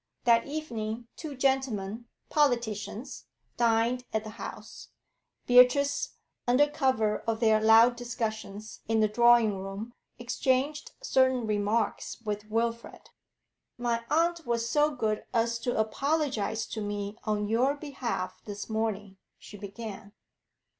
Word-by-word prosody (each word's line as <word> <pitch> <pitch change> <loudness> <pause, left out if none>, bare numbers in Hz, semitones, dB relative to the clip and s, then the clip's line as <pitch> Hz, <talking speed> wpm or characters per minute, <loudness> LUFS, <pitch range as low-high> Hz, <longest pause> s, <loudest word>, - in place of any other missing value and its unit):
That 235 0 +4
evening 235 -6 -4
two 305 -4 -7
gentlemen, 240 -5 0 0.2
politicians, 240 -3 -1 0.3
dined 235 +1 +2
at 220 -1 -1
the 215 - -7
house; - - -9 0.6
Beatrice, 250 +3 +4 0.3
under 250 +4 +5
cover 260 -8 +1
of 225 -1 0
their 220 -2 +4
loud 225 +2 +6
discussions 220 -3 -5
in 225 0 +2
the 215 - +4
drawing 230 -2 +4
room, 195 +5 -6 0.2
exchanged 260 +4 -1
certain 260 - +3
remarks 210 +1 -1
with 210 -1 -4
Wilfrid. 230 +1 -3 0.7
'My 235 -1 -1
aunt 335 +2 +2
was 235 -3 -1
so 295 +4 +3
good 220 -7 -2
as 230 0 +1
to 245 +1 -2
apologise 230 -2 0
to 220 - -5
me 205 0 -4
on 210 -1 0
your 250 +6 +2
behalf 265 -10 -4
this 205 -1 -6
morning,' 210 -3 -2 0.2
she - - -12
began. 205 0 -8
230 Hz, 120 wpm, -29 LUFS, 215-255 Hz, 0.7 s, loud